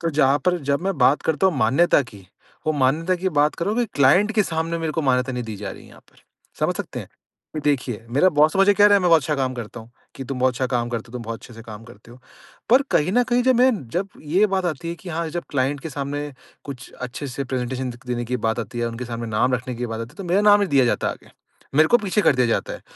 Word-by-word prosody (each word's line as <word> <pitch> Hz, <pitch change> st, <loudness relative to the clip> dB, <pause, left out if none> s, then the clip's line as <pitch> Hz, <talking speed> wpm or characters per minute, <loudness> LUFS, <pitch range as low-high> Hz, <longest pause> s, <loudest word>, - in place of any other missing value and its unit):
तो 165 Hz, -1 st, -1 dB
जहाँ 145 Hz, -1 st, +3 dB
पर 180 Hz, -1 st, +2 dB
जब 140 Hz, -, +1 dB
मैं 195 Hz, -3 st, -1 dB
बात 130 Hz, +3 st, +4 dB
करता 160 Hz, +4 st, +1 dB
हूँ 175 Hz, -7 st, +1 dB
मान्यता 140 Hz, +7 st, +3 dB
की 95 Hz, -3 st, -14 dB, 0.4 s
वो 155 Hz, -, +2 dB
मान्यता 150 Hz, +6 st, +1 dB
की 190 Hz, +2 st, -1 dB
बात 150 Hz, -2 st, +2 dB
कर 170 Hz, -, -3 dB
रहा 210 Hz, -, 0 dB
हूँ 245 Hz, -, 0 dB
कि 235 Hz, -, +1 dB
क्लाइंट 175 Hz, +10 st, +4 dB
के 215 Hz, -, +4 dB
सामने 165 Hz, -1 st, -2 dB
मेरे 160 Hz, -2 st, -2 dB
को 160 Hz, -, -2 dB
मान्यता 130 Hz, -1 st, +1 dB
नहीं 125 Hz, -1 st, -3 dB
दी 110 Hz, -2 st, -6 dB
जा 100 Hz, -1 st, -6 dB
रही -, -, -11 dB
है -, -, -16 dB
यहाँ -, -, -16 dB
पर। -, -, -29 dB, 0.4 s
समझ -, -, +1 dB
सकते -, -, -5 dB
हैं? -, -, -11 dB, 0.6 s
देखिए 125 Hz, -6 st, -1 dB
मेरा 165 Hz, +8 st, +4 dB
बॉस 155 Hz, -1 st, +3 dB
तो 195 Hz, -, -2 dB
मुझे 200 Hz, +1 st, +6 dB
कह 205 Hz, +1 st, +6 dB
रहा 205 Hz, -, +5 dB
है -, -, +6 dB
कि -, -, -4 dB
मैं 180 Hz, -, +3 dB
बहुत 165 Hz, -2 st, +6 dB
अच्छा 150 Hz, +2 st, -1 dB
काम 130 Hz, -2 st, -1 dB
करता 120 Hz, -1 st, -7 dB
हूँ 115 Hz, +1 st, -15 dB, 0.2 s
कि, 135 Hz, -, -7 dB
"तुम 135 Hz, 0 st, -5 dB
बहुत 130 Hz, 0 st, +3 dB
अच्छा 130 Hz, 0 st, -1 dB
काम 120 Hz, -1 st, 0 dB
करते 115 Hz, -2 st, -3 dB
हो, -, -, -16 dB
तुम 125 Hz, -1 st, -6 dB
बहुत 115 Hz, 0 st, -5 dB
अच्छे 120 Hz, -, -13 dB
से 115 Hz, -, -11 dB
काम 110 Hz, -1 st, -10 dB
करते 115 Hz, -1 st, -16 dB
हो।" 120 Hz, -, -14 dB, 0.5 s
पर 260 Hz, +3 st, +6 dB
कहीं 160 Hz, +5 st, +2 dB
न 245 Hz, +2 st, +4 dB
कहीं 245 Hz, 0 st, +3 dB
जब 260 Hz, 0 st, +3 dB
मैं 255 Hz, +2 st, +5 dB, 0.2 s
जब 195 Hz, +3 st, -2 dB
ये 180 Hz, +8 st, +2 dB
बात 190 Hz, -2 st, -1 dB
आती 165 Hz, 0 st, -4 dB
है 170 Hz, -, -3 dB
कि 175 Hz, -, -12 dB
हाँ, 165 Hz, 0 st, -3 dB
जब 175 Hz, +1 st, -4 dB
क्लाइंट 140 Hz, +1 st, 0 dB
के 160 Hz, -, -7 dB
सामने 145 Hz, +1 st, -4 dB, 0.3 s
कुछ 135 Hz, -4 st, -9 dB
अच्छे 125 Hz, +3 st, -6 dB
से 135 Hz, +1 st, -4 dB
प्रेजेंटेशन 130 Hz, 0 st, -3 dB
दे 120 Hz, -, -9 dB
क -, -, -26 dB
देने 120 Hz, -1 st, -2 dB
की 125 Hz, +2 st, -2 dB
बात 110 Hz, -, -1 dB
आती 115 Hz, +2 st, -7 dB
है -, -, -1 dB
या 120 Hz, -, 0 dB
उनके 120 Hz, +2 st, -6 dB
सामने 115 Hz, -1 st, -5 dB
नाम 120 Hz, +4 st, +1 dB
रखने 125 Hz, +1 st, -4 dB
की 120 Hz, +1 st, -4 dB
बात 115 Hz, 0 st, -5 dB
आती 115 Hz, +1 st, -6 dB
है -, -, -24 dB
तो 195 Hz, -, -7 dB
मेरा 180 Hz, +3 st, +2 dB
नाम 205 Hz, 0 st, +6 dB
नहीं 200 Hz, -, 0 dB
दिया 135 Hz, -2 st, +4 dB
जाता 120 Hz, -, 0 dB
है -, -, -2 dB
आगे। -, -, -21 dB, 0.4 s
मेरे 155 Hz, +2 st, +5 dB
को 240 Hz, -, +5 dB
पीछे 210 Hz, 0 st, 0 dB
कर 140 Hz, -, +4 dB
दिया 125 Hz, -, +3 dB
जाता 115 Hz, -, -1 dB
है -, -, -9 dB
140 Hz, 300 wpm, -22 LUFS, 125-175 Hz, 0.6 s, मुझे